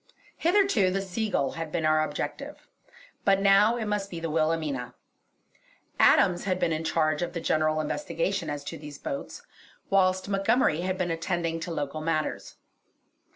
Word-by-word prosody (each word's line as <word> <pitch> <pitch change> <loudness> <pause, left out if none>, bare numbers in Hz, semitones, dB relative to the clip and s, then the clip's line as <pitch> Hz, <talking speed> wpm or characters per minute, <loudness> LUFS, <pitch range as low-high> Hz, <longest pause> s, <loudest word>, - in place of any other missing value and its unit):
Hitherto 345 - +3
the 190 +1 -1
Seagull 195 - -1
had 165 -1 -6
been 160 -1 -1
our 155 0 +4
objective; 155 - -5 0.6
but 195 -1 +4
now 200 +4 +5
it 225 - -3
must 210 -1 -2
be 170 - -6
the 165 -1 -3
Wilhelmina. 155 -5 -1 1.0
Adams 175 0 +4
had 185 -2 0
been 165 - +1
in 155 +1 -2
charge 155 -1 +1
of 175 0 -3
the 170 - -3
general 155 -1 +1
investigation 175 - -2
as 145 -1 -4
to 165 +2 -7
these 150 -1 -9
boats, 300 +10 -6 0.5
whilst 185 -1 +3
Montgomery 195 -3 +2
had 185 +1 -2
been 180 -2 -1
attending 165 0 -2
to 165 +1 -5
local 150 -1 -3
matters. 155 -1 -2
170 Hz, 155 wpm, -27 LUFS, 155-195 Hz, 1.0 s, now